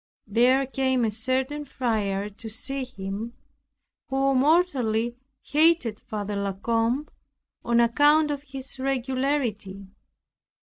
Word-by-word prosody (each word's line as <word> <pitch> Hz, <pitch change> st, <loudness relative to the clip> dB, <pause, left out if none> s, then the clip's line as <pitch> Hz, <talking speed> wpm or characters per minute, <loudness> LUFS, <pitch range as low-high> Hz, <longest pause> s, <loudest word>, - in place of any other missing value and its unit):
There 250 Hz, +6 st, +3 dB
came 260 Hz, -2 st, +1 dB
a 220 Hz, -, 0 dB
certain 260 Hz, +6 st, -1 dB
friar 215 Hz, -7 st, -1 dB
to 225 Hz, +2 st, -9 dB
see 260 Hz, +4 st, -4 dB
him, 205 Hz, 0 st, -6 dB, 0.7 s
who 270 Hz, 0 st, +1 dB
mortally 255 Hz, -6 st, +2 dB, 0.3 s
hated 300 Hz, -8 st, +2 dB
Father 205 Hz, -1 st, -5 dB
La 200 Hz, -1 st, -1 dB
Combe, 230 Hz, +7 st, 0 dB, 0.6 s
on 235 Hz, 0 st, +2 dB
account 295 Hz, +6 st, +4 dB
of 285 Hz, -1 st, -3 dB
his 270 Hz, -1 st, -9 dB
regularity. 255 Hz, -6 st, -1 dB
255 Hz, 105 wpm, -25 LUFS, 220-275 Hz, 0.7 s, account